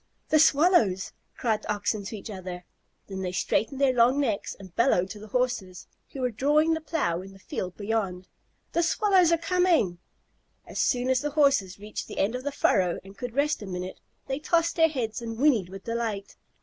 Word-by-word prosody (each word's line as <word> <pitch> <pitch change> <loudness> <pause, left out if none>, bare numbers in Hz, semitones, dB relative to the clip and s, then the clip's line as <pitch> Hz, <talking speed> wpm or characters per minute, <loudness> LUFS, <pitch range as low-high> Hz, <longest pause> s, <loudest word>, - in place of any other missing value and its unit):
"The 310 - +5
Swallows!" 290 - +4 0.2
cried 225 -4 0
the - - -3
Oxen 205 0 -1
to 220 +2 -5
each 210 - -8
other. 180 -2 -7 0.4
Then 190 -1 -6
they 180 -1 -2
straightened 225 +8 0
their 275 -2 +4
strong 245 +3 +4
necks 220 -7 -1
and 190 -3 -13
bellowed 195 -7 +2
to 210 - -8
the 215 - -10
Horses, 210 -6 -2 0.3
who 270 - -6
were 250 -1 0
drawing 300 +7 +3
the 320 - -2
plow 290 - -1
in 195 +1 -11
the - - -14
field 185 -1 -5
beyond, 200 -4 -2 0.5
"The 340 - +2
Swallows 365 0 +3
are 335 - +4
coming!" 335 - +2 0.7
As - - -6
soon 250 -1 +1
as 260 -1 +2
the 295 - -1
Horses 275 -11 +2
reached 210 +1 -6
the - - -9
end 200 +4 +1
of 250 +1 -4
the 285 - -2
furrow 185 -10 +2
and 195 +1 -13
could 245 +3 -6
rest 295 -1 +1
a 205 - -7
minute, 180 0 -5 0.3
they 270 +1 -3
tossed 335 +2 +1
their 325 -1 +5
heads 240 -7 -3
and 225 -1 -5
whinnied 240 -9 +3
with 195 0 -9
delight. 225 -4 -3
230 Hz, 200 wpm, -27 LUFS, 195-290 Hz, 0.7 s, The